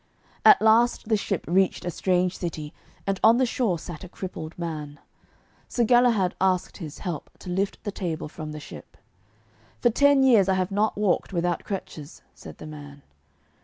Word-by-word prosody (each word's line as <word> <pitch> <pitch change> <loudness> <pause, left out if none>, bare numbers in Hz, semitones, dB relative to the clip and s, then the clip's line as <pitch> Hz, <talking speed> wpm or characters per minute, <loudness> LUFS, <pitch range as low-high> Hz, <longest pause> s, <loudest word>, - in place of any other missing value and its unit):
At - - +7
last 225 +1 +3
the 220 - +4
ship 200 -3 -2
reached 185 +2 +1
a 175 - -2
strange 180 +1 0
city, 155 -4 -5 0.3
and 195 -1 -1
on 225 +2 +7
the 260 - +3
shore 230 -7 0
sat 160 0 -9
a 185 - -9
crippled 170 -4 -7
man. 155 -4 -5 0.7
Sir 240 - 0
Galahad 235 -6 +3
asked 185 -1 +1
his 155 -6 -8
help 175 -6 -5
to 180 - -8
lift 195 +2 -2
the 205 - -3
table 170 -6 -4
from 155 0 -8
the 150 - -7
ship. 145 - -12 0.8
'For 240 - +3
ten 285 +2 +4
years 225 -8 +5
I 190 - +3
have 185 +1 -1
not 210 +2 0
walked 200 -1 0
without 175 -1 -1
crutches,' 160 -6 -7
said - - -12
the - - -10
man. 145 -2 -10
185 Hz, 175 wpm, -25 LUFS, 165-215 Hz, 0.8 s, At